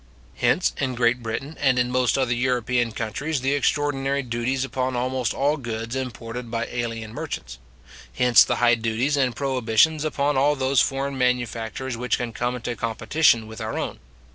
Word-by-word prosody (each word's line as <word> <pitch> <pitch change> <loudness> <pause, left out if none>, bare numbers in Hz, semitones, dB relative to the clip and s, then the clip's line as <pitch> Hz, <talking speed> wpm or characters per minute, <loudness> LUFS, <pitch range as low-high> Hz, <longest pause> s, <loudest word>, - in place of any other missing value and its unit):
Hence, - - +2
in 130 -2 -1
Great 120 +1 +2
Britain, 115 +7 -4
and 135 -3 +3
in 125 0 +1
most 125 0 +2
other 130 -3 +1
European 120 -1 0
countries, 125 +7 -3
the 135 +2 +1
extraordinary 140 -1 0
duties 125 +2 -1
upon 130 -1 -2
almost 125 -1 -1
all 145 +3 +1
goods 115 -2 -5
imported 125 -2 -5
by 115 0 -2
alien 115 -2 -4
merchants. 120 - -6 0.6
Hence 125 -1 +6
the - - 0
high 120 -1 +4
duties 115 +5 0
and 130 -4 +1
prohibitions 135 +3 +2
upon 145 -2 0
all 145 +2 +3
those 135 -2 +2
foreign 135 0 -1
manufactures 125 0 -1
which 125 +1 0
can 120 -2 -4
come 120 +2 -1
into 120 0 -4
competition 115 +2 +2
with 110 +1 -9
our 110 0 -3
own. - - -4
125 Hz, 165 wpm, -24 LUFS, 115-135 Hz, 0.6 s, Hence